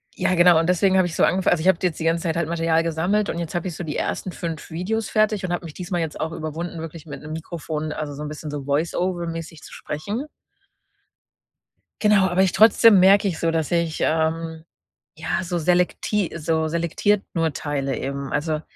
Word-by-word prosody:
ja, 185 - +1
genau, 175 -1 +6
und 165 - 0
deswegen 190 +1 +3
habe 185 -1 +4
ich 160 - -6
so - - +2
angefangen 185 -1 +3
also, 165 - -1
ich 175 - 0
habe 190 -3 +5
da 185 - +2
jetzt 165 - -5
die - - -3
ganze 165 0 +1
Zeit 165 -3 -1
halt 170 -1 -1
Material 165 -1 +1
gesammelt 175 +6 0
und 170 - -3
jetzt 170 0 -5
habe 175 +2 -1
ich 175 - -5
so 175 - -5
die 150 -2 -4
ersten 185 - -2
5 165 -4 -6
Videos 200 +7 -2
fertig 215 -2 +1
und 175 - -2
habe 175 - -3
mich 155 - -8
diesmal 175 0 -3
jetzt 160 -2 -4
auch 160 +1 -3
überwunden, 165 +2 -5
wirklich 165 0 -8
mit 150 - -8
'nem 155 +1 -9
Mikrofon, 160 -1 -5
also, 150 -2 -5
so 150 - -8
'n 150 - -4
bisschen 150 0 -7
so 145 -2 -5
Voiceover-mäßig 165 +1 -2
zu - - -13
sprechen. 205 - -4 1.8
Genau, 210 -3 +5
aber 185 +2 +2
ich 185 - +2
trotzdem 215 +1 +6
merke 200 +2 +6
ich 170 -4 -3
so, 165 - +1
dass 160 -1 -1
ich, 170 -2 0
ähm, 160 0 0 0.5
ja, - - -2
so 175 0 -2
selekti 180 +3 +1
so 160 0 0
selektiert 170 +5 0
nur 165 -3 0
teile 140 -2 -2
eben. 140 0 -4
Also, 155 0 -1
165 Hz, 215 wpm, -23 LUFS, 160-180 Hz, 1.8 s, genau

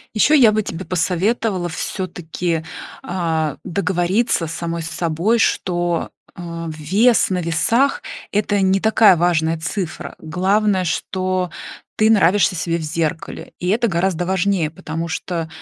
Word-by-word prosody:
Еще 295 +8 +5
я 235 -5 +6
бы 215 0 +1
тебе 185 -2 -6
посоветовала 185 +2 0
всё-таки, 175 -2 -3 0.4
а, 160 -5 -2
договориться 190 +1 0
самой 165 +1 -4
с 160 - -5
собой, 170 +8 0
что, 175 -4 0 0.3
э, 170 -1 -6
вес 200 +12 +3
на 185 - 0
весах- 230 - +1 0.3
это 205 -1 +1
не 190 +1 +3
такая 220 -4 +5
важная 165 -1 +1
цифра. 175 +1 -4
Главное, 190 +4 +1
что 185 +1 -1 0.5
ты 215 +1 +3
нравишься 190 -3 +4
себе 170 +1 -1
в 170 - -5
зеркале, 160 0 -3
и 180 - -2
это 235 +3 +2
гораздо 175 -1 0
важнее, 185 -3 0
потому 160 +1 -5
что, 165 -1 -3
180 Hz, 130 wpm, -20 LUFS, 165-200 Hz, 0.5 s, я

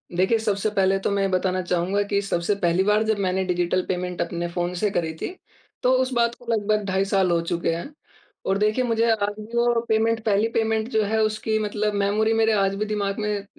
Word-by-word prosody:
देखिए, 190 +6 +3
सबसे 210 -1 0
पहले 195 -2 +2
तो - - -1
मैं 200 -1 +1
बताना 185 0 0
चाहूँगा 180 +3 0
कि 200 -1 +1
सबसे 195 0 -1
पहली 180 -1 +1
बार 210 +2 +3
जब 220 -1 0
मैंने 190 -1 0
डिजिटल 180 0 0
पेमेंट 180 -1 -3
अपने 170 0 -2
फ़ोन 175 +1 -3
से 205 +3 0
करी 160 -5 -1
थी, - - -2 0.5
तो 250 - +4
उस 260 - -1
बात 235 0 +1
को 245 - -17
लगभग 215 -1 +1
ढाई 190 +1 +1
साल 195 -2 +2
हो 170 - +3
चुके 170 0 -2
हैं 225 - -7 0.5
और 195 - +1
देखिए 215 +5 +1
मुझे 230 -1 +1
आज 205 -2 0
भी 220 +3 -6
वो 235 -1 +2
पेमेंट 225 +1 +2
पहली 210 0 +2
पेमेंट 225 -1 0
जो 220 -4 +1
है 220 +2 0
उसकी 215 0 0
मतलब 210 0 -1
मेमोरी 205 +2 +1
मेरे 225 0 +3
आज 195 -1 +1
भी 210 +2 -2
दिमाग 205 -1 -2
में 210 -1 -2
205 Hz, 215 wpm, -23 LUFS, 185-220 Hz, 0.5 s, तो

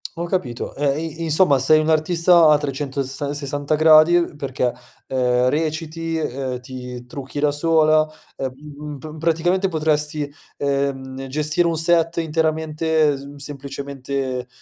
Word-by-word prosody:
Ho 170 0 -3
capito, 150 -10 -3
e 140 0 0
i 165 +1 -7
insomma 155 -3 +4
sei 155 +4 +5
un'artista 165 +2 +4
a 150 - +6
trecentosessa 140 0 -3
sessanta 145 +1 -2
gradi, 155 +2 +6
uhm, 170 -3 +1
perché, 130 -3 -2 0.3
ehm, 125 -1 +1
reciti, 160 +2 -2
ehm, 130 -4 -3
ti 125 -1 -8
trucchi 135 +2 -7
da 145 0 +2
sola 155 0 +3 0.3
e, - - -4
uhm, 140 +3 -8 0.2
uhm, - - -7
pr 155 +3 -9
praticamente 170 +4 +1
potresti, 150 -3 -1 0.3
ehm, 135 -1 -2
gestire 150 +5 0
un 165 -1 0
set 165 +1 +2
interamente 160 -1 +1
mhmm, 140 +1 -10
semplicemente, 140 -2 -5
150 Hz, 135 wpm, -21 LUFS, 135-160 Hz, 0.3 s, a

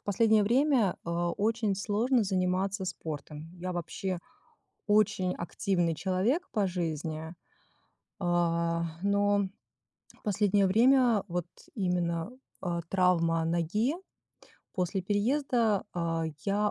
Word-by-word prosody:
в - - -49
последнее 215 +1 +3
время, 240 -2 +3
а, 170 +1 -1
очень 220 -1 0
сложно 220 +6 +1
заниматься 190 0 0
спортом. 155 -3 -6
Я 185 +1 -4
вообще 180 +2 -3 0.7
очень 205 -3 +3
активный 175 -1 -1
человек 200 - 0
по 205 -4 +1
жизни. 160 -2 -3 0.9
А, 170 -2 +1 0.2
но 200 0 +2 0.7
в - - -31
последнее 205 -1 +2
время 235 +1 +4
вот 175 -1 -2 0.3
именно, 180 -2 -1 0.3
а, 175 -2 -2
травма 170 -3 +2
ноги, 175 - 0 0.8
после 185 0 -1
переезда, 225 +1 +1
а, 165 -1 -1 0.2
я 205 +1 +1
190 Hz, 105 wpm, -29 LUFS, 170-210 Hz, 0.9 s, время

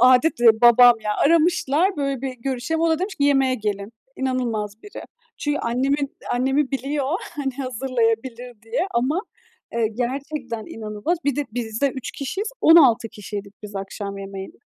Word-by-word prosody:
Âdet 255 +3 +5
değil 240 -1 +8
babam 240 0 +8
ya. 210 -1 -2
Aramışlar, 335 +2 +3
"Böyle 275 -3 -2
bir 265 -1 -3
görüşelim." 265 +6 -2
O 330 - +3
da 320 - +2
demiş 380 +3 -3
ki, 285 - 0
"Yemeğe 270 -2 +3
gelin." 205 -1 -3 0.2
İnanılmaz 230 -5 -2
biri. 415 - -9 0.4
Çünkü 295 -1 -1
annemin 275 +4 -1 0.2
annemi 265 +3 +1
biliyor, 275 +1 -2 0.3
hani, 270 -3 -2
hazırlayabilir 245 -2 -2
diye. 225 +11 -1
Ama, 265 +10 0 0.5
eee, 230 -2 +1
gerçekten 250 0 -4
inanılmaz. 215 +10 -3
Bir 285 -3 +1
de 290 - 0
biz 225 -1 -4
de 280 - +4
3 260 -2 -6
kişiyiz, 380 - -4
16 260 -8 +6
kişiydik 205 -2 -8
biz 205 -1 -8
akşam 200 +1 -5
yemeğinde 195 -1 -8
255 Hz, 155 wpm, -22 LUFS, 225-285 Hz, 0.5 s, değil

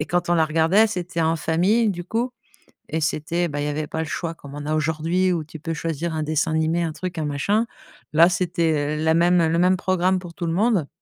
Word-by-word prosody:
et 150 - -2
quand 175 0 -1
on - - +4
la 160 -2 +4
regardait, 165 +7 +3
c'était 180 -4 -3
en 165 +1 +2
famille, 190 +9 +2
du 175 -2 -4
coup 235 +6 -1 0.6
et 160 +1 -2
c'était, 160 +3 -1
bah, 145 0 -4
il - - -1
y - - -1
avait 150 +1 -2
pas 160 - -5
le 160 - -1
choix 165 +2 -3
comme 145 -3 -12
on 145 0 -6
a 155 - -1
aujourd'hui 160 +4 +1
où 165 -3 -2
tu 155 +1 -11
peux 165 +2 -4
choisir 165 +1 -3
un 155 - -1
dessin 155 +1 0
animé, 160 +2 +1
un 160 -2 -2
truc, 180 +3 -6
un 155 - -1
machin. 200 +10 0 0.5
Là, 165 +3 +7
c'était 165 -4 0
la 160 +1 +2
même, 175 +1 +4
heu, 160 - +2
le 165 +1 +1
même 180 +1 +4
programme 185 0 +1
pour 175 -2 -10
tout 170 - -5
le 165 - -1
monde. 200 -4 +2
165 Hz, 250 wpm, -23 LUFS, 155-180 Hz, 0.6 s, Là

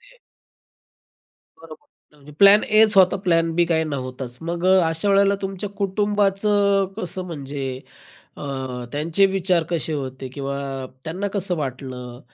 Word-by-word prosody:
ते. - - -21 1.4
बरोबर, 160 -1 -14 0.3
म्हणजे 145 +1 -15
प्लॅन 200 +1 +7
एच 215 0 +4
होता, 185 -1 +6
प्लॅन 165 -2 +2
बी 175 +1 +3
काही 160 -1 +1
नव्हताच. 130 -4 -5
मग 170 +1 -4
अ, 190 0 +6
अशा 165 +5 -1
वेळेला 200 0 +4
तुमच्या 195 +1 -4
कुटुंबाचं 200 0 +1
कसं 185 -3 -4
म्हणजे 140 -4 -6 0.7
अ, - - -9 0.5
त्यांचे 160 +6 +1
विचार 185 -3 +1
कसे 165 -2 -1
होते 130 -2 -5
किंवा 140 -1 -4 0.5
त्यांना 185 +6 -3
कसं 185 -3 -1
वाटलं 130 -3 -6
175 Hz, 130 wpm, -22 LUFS, 145-195 Hz, 1.4 s, प्लॅन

